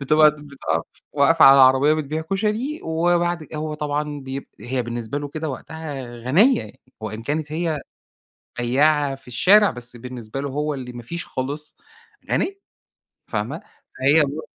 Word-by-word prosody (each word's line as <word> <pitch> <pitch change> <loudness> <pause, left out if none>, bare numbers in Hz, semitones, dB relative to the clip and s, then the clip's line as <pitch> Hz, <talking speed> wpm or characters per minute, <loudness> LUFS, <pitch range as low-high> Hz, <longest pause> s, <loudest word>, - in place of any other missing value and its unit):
بتبقى 155 +2 +5
بتب 150 -1 -13 0.2
آه، 85 - 0 0.3
واقفة 150 +3 +5
على 135 0 +9
عربية 135 +3 +6
بتبيع 155 +1 -3
كشري 215 +9 -1
وبعد 175 0 +1
ك 155 - -13
هو 155 0 -3
طبعًا 150 0 -3
بيب 135 0 -6
هي 125 +1 -2
بالنسبة 120 +3 -4
له 145 0 -5
كده 155 +2 -4
وقتها 150 0 -6 0.2
غَنيّة 195 - +3 0.3
وإن 110 +1 -5
كانت 150 +4 -2
هي 160 -2 -1 0.8
بياعة 140 +3 +2
في 135 -2 -15
الشارع، 200 - +5
بس 120 -1 -7
بالنسبة 125 0 -7
له 140 - -3
هو 150 +2 -1
اللي 125 -2 -7
ما 120 0 -8
فيش 170 +8 -5
خالص، 145 +3 -5 0.5
غَنيّة، 395 +1 0 0.7
فاهمة؟ - - -3 0.4
فهي 140 +5 +5
الو 145 +2 -2
145 Hz, 150 wpm, -22 LUFS, 130-160 Hz, 0.8 s, على